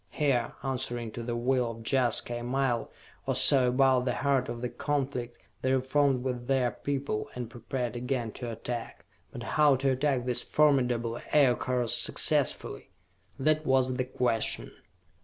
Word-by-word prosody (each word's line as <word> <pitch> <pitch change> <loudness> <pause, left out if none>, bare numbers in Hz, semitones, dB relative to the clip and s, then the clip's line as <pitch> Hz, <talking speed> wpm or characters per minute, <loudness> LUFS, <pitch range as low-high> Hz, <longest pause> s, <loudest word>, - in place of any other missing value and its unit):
Here, 135 -6 0
answering 120 -3 -3
to 120 - -6
the 120 0 -3
will 125 0 +1
of 115 0 -8
Jaska, 120 -2 +2
a - - -7
mile 125 -1 -1 0.4
or 135 - +1
so 130 0 +6
above 130 0 +3
the - - 0
heart 135 -2 +1
of 120 - -5
the 125 - -1
conflict, 135 -5 -3 0.2
they 130 - 0
reformed 130 0 +1
with 125 -2 -4
their 130 -3 +2
people, 140 -6 -3
and 120 -2 -5
prepared 120 +1 -4
again 120 -2 -2
to 120 0 -6
attack. 115 +1 -6 0.3
But - - -7
how 150 -2 +3
to 135 +1 +1
attack 130 -1 0
these 125 -1 0
formidable 125 -6 +1
Aircars 125 -4 +2
successfully? - - 0 0.5
That 155 +3 +1
was 130 -2 +2
the 130 - 0
question. 125 -3 -1
125 Hz, 155 wpm, -29 LUFS, 120-135 Hz, 0.5 s, so